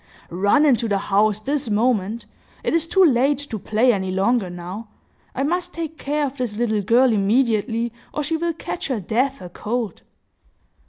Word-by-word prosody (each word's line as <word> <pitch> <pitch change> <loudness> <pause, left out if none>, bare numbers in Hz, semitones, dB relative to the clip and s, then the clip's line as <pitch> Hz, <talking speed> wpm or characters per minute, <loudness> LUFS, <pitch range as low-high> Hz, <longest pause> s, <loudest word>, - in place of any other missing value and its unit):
"Run 200 - +3
into 245 -5 +3
the 200 -2 +1
house, 205 +1 +2
this 275 +2 -2
moment! 220 0 0 0.4
It - - 0
is 330 -1 +1
too 385 0 +5
late 275 0 +3
to 270 -6 -5
play 230 +5 +2
any 190 -2 -2
longer, 195 +2 +1
now. 180 +5 -7 0.5
I 270 - 0
must 355 +4 -1
take 320 -2 -5
care 295 +1 0
of 275 0 -6
this 235 -5 -3
little 220 -3 +1
girl 235 +4 +4
immediately, 225 +2 +1 0.2
or 300 - -2
she 320 +3 -1
will 335 +1 -1
catch 325 - -5
her 260 -5 -1
death 250 +8 -1
a 180 - -8
cold!" 220 +1 -4
235 Hz, 175 wpm, -22 LUFS, 210-280 Hz, 0.5 s, too